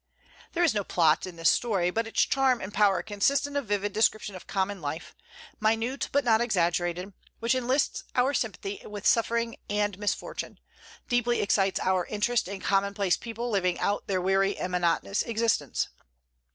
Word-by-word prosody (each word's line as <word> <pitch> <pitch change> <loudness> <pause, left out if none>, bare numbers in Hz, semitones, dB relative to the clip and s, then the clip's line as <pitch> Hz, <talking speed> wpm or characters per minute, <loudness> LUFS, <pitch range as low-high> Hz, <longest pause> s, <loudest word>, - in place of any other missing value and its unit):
There 350 - +1
is 335 - +4
no 205 -1 0
plot 165 -2 +2
in 180 - -9
this 165 0 +4
story, 195 -7 +1
but 225 +3 -1
its 225 - +2
charm 265 -2 +2
and 195 0 -7
power 200 -2 +3
consist 265 +8 +1
in 285 0 -7
a 285 - +2
vivid 205 -4 -2
description 215 -1 +1
of 185 - -10
common 195 -1 -2
life, 150 +2 -5 0.5
minute 225 +5 0
but 285 -1 +1
not 225 -1 +4
exaggerated, 175 -3 0 0.2
which 230 +2 +1
enlists 255 +2 0
our 255 +3 +3
sympathy 205 -5 -3
with 205 0 -8
suffering 230 0 +2
and 205 -2 -1
misfortune, 205 -1 -3 0.5
deeply 245 0 +1
excites 195 -1 +2
our 185 -2 +1
interest 220 +2 0
in 195 0 -6
commonplace 200 -1 +1
people 235 +1 -5
living 185 -4 +1
out 205 - -1
their 190 -2 0
weary 195 +2 +1
and 180 - -3
monotonous 180 +3 +1
existence. 230 0 0
205 Hz, 165 wpm, -27 LUFS, 190-235 Hz, 0.5 s, is